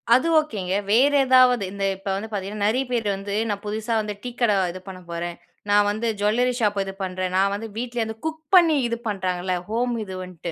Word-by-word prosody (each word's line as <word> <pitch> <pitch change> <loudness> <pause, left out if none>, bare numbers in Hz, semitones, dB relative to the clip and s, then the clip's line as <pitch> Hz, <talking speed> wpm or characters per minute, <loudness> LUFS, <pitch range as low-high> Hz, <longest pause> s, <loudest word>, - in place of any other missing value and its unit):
அது 260 +6 +2
ஓகேங்க. 205 -12 -3 0.2
வேற 265 +6 +5
ஏதாவது 255 -3 +5
இந்த 200 0 -5
இப்ப 195 +1 -7
வந்து 200 +3 -4
பார்த்தீங்கன்னா 205 +1 -3
நெறைய 255 +5 +1
பேர் 230 -3 0
வந்து, 200 +1 -6 0.2
நான் 200 -1 -2
புதுசா 215 +2 -2
வந்து 210 -1 -4
டீ 250 - -3
கடை 225 -5 +3 0.2
இது 185 - -8
பண்ண 185 -1 -8
போறேன். 170 0 -4 0.3
நான் 205 0 +4
வந்து 215 +3 -2
ஜுவல்லரி 235 +5 +2
ஷாப் 205 -3 +1
இது 195 0 -6
பண்றேன். 185 0 -3
நான் 195 +1 +3
வந்து 225 +3 -4
வீட்டலருந்து 235 -2 -3
குக் 320 0 -3
பண்ணி 335 -3 +6
இது 235 - -2
பண்ணுறாங்கல்ல, 185 -3 -1
ஹோம் 240 +2 0
இது 190 -2 -8
வன்ட்டு. 180 -2 -7
210 Hz, 200 wpm, -23 LUFS, 195-240 Hz, 0.3 s, பண்ணி